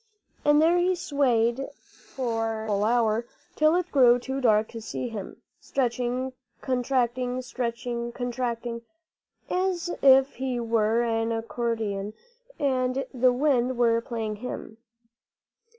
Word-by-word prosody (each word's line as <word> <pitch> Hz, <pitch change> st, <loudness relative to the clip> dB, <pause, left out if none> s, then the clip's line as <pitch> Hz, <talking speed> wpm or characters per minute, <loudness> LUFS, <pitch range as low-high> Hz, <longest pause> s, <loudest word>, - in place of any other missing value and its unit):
And 295 Hz, 0 st, +5 dB
there 335 Hz, +3 st, +4 dB
he 365 Hz, +1 st, +2 dB
swayed 265 Hz, -6 st, +1 dB
for 225 Hz, -3 st, -4 dB
a -, -, -6 dB
full 205 Hz, -1 st, +1 dB
hour, 230 Hz, 0 st, +1 dB, 0.3 s
till 310 Hz, +2 st, +4 dB
it 360 Hz, 0 st, -1 dB
grew 250 Hz, -3 st, +6 dB
too 265 Hz, +2 st, -4 dB
dark 220 Hz, -3 st, +3 dB
to 230 Hz, -, -8 dB
see 240 Hz, +2 st, -4 dB
him, 210 Hz, -4 st, -8 dB, 0.2 s
stretching, 250 Hz, 0 st, -1 dB, 0.3 s
contracting, 255 Hz, -1 st, -1 dB
stretching, 240 Hz, -1 st, -3 dB
contracting, 240 Hz, -1 st, -3 dB, 0.7 s
as 360 Hz, -2 st, -1 dB
if 270 Hz, 0 st, +5 dB
he 255 Hz, -2 st, -2 dB
were 230 Hz, 0 st, +1 dB
an 225 Hz, -1 st, 0 dB
accordion 225 Hz, -3 st, -2 dB, 0.4 s
and 260 Hz, -1 st, 0 dB
the 255 Hz, 0 st, +4 dB
wind 255 Hz, -2 st, +1 dB
were 230 Hz, -1 st, +3 dB
playing 225 Hz, -3 st, -4 dB
him. 220 Hz, -1 st, -7 dB
245 Hz, 120 wpm, -26 LUFS, 230-265 Hz, 0.7 s, grew